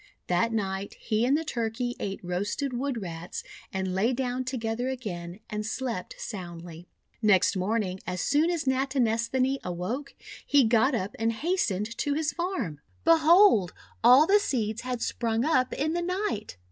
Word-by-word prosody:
That 180 +6 +1
night 195 -3 -2
he 225 +1 0
and 280 +3 +4
the 320 - -2
Turkey 240 -1 -2
ate 195 -1 -3
roasted 205 +10 -2
Wood 245 -3 -2
Rats, 170 -1 -6 0.3
and 190 -1 -2
lay 215 +7 +2
down 250 0 -1
together 245 -1 -2
again, 185 -8 -5
and 210 0 -3
slept 225 -3 -4
soundly. 175 -4 -7 0.3
Next 210 -4 +4
morning, 190 0 -1
as 180 0 -3
soon 300 - +2
as 335 -4 -1
Natinesthani 260 0 +1
awoke, 180 +11 -4 0.3
he 285 -2 +4
got 235 +4 +3
up 200 -2 -3
and 225 0 +2
hastened 230 - -1
to 290 -1 0
his 305 -1 0
farm. 265 - -3 0.2
Behold, 330 - +6 0.3
all 250 +6 +8
the 400 +4 +5
seeds 230 - -1
had 250 -2 -3
sprung 230 +1 0
up 255 -5 +2
in 310 +3 -1
the 345 - 0
night! 360 - -2
230 Hz, 155 wpm, -27 LUFS, 195-275 Hz, 0.3 s, all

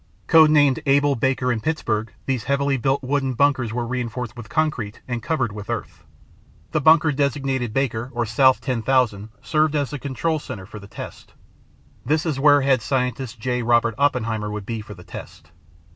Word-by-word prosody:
Code 160 -2 +6
named 145 -1 +4
Able, 140 +1 +4
Baker, 130 0 0
and 115 -3 -1
Pittsburgh, 115 -8 -1
these 130 -4 -2
heavily 140 0 +1
built 135 +2 0
wooden 135 -1 -1
bunkers 130 -3 +2
were 120 +1 -2
reinforced 120 -1 -4
with 115 -3 -10
concrete, 120 -6 -1
and 120 -2 -3
covered 130 -8 -1
with 105 -1 -9
earth. - - -5 0.7
The 155 - 0
bunker 160 +1 +5
designated 135 -4 -1
Baker 120 -1 -1
or 120 -2 -1
South 130 +3 +3
10,000 120 -4 0
served 155 -1 +1
as 145 -2 -1
the 145 - -5
control 150 +4 -2
center 95 -9 -8
for 105 +2 -10
the 100 - -12
test. - - -10 0.7
This 155 +2 0
is 150 -5 -1
where 145 0 +5
head 135 -2 +2
scientist 125 -1 -2
J. 125 +2 -1
Robert 120 0 +2
Oppenheimer 115 -6 0
would 105 -1 -5
be 115 0 -4
for 105 -1 -10
the 90 - -13
test. 75 -2 -11
130 Hz, 175 wpm, -22 LUFS, 115-140 Hz, 0.7 s, Code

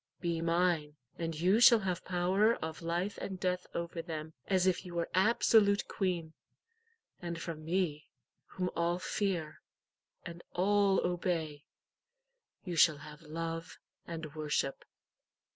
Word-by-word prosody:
Be 170 -2 -1
mine, 165 -3 +1 0.2
and 165 -2 -3
you 185 +6 +4
shall 235 -2 +8
have 185 -2 -2
power 190 +5 +2
of 160 +1 -6
life 175 +4 -2
and 190 -2 -5
death 180 -1 -1
over 170 0 -3
them, 160 -2 -6
as 185 -2 +2
if 185 -1 +2
you 180 -2 -9
were 170 -1 -2
absolute 205 0 +4
queen. 175 -5 -2 0.9
And 170 -1 -4
from 165 -2 -6
me, 165 -3 -1 0.4
whom 180 -1 -3
all 170 +1 +1
fear, 175 -4 -2 0.6
and 170 -1 -8
all 200 +1 +3
obey, 165 -4 -2 1.0
you 175 -2 -3
shall 160 -2 +5
have 150 +2 -11
love 165 +2 -5 0.3
and 160 -3 -6
worship." 150 -3 -2
170 Hz, 130 wpm, -32 LUFS, 160-185 Hz, 1.0 s, shall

